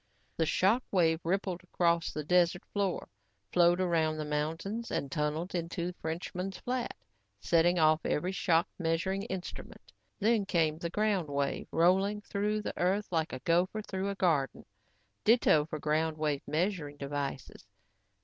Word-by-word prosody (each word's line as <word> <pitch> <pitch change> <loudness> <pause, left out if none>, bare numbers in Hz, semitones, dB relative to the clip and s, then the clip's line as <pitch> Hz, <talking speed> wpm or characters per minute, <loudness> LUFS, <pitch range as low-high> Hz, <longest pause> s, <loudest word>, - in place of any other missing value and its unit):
The 160 - +1
shock 200 +10 +3
wave 165 -4 +3
rippled 185 0 -1
across 170 -2 +1
the 155 - -4
desert 180 +2 +2
floor, 200 -4 -1 0.5
flowed 175 0 +5
around 165 -4 +1
the 155 - -3
mountains 165 +10 -3
and 140 - -2
tunneled 155 +4 -2
into 170 +1 -3
Frenchman's 180 +4 -4
Flat, 250 -1 -3 0.4
setting 170 - +3
off 155 -1 +4
every 180 +5 0
shock 170 -3 +2
measuring 170 +3 0
instrument. 180 - -7 0.3
Then 215 -1 +2
came 160 -4 +1
the 170 - -3
ground 200 -4 0
wave, 140 -1 -1
rolling 190 +5 +3
through 210 +1 -1
the - - -3
earth 195 +4 +1
like 160 -2 0
a 130 - -6
gopher 185 +6 +1
through 190 -1 -3
a 200 - -3
garden. 155 -9 0 0.6
Ditto 210 -10 +5
for 155 0 -5
ground 155 +1 0
wave 150 -2 0
measuring 160 -3 -1
devices. 140 -4 -5
170 Hz, 145 wpm, -31 LUFS, 155-195 Hz, 0.6 s, flowed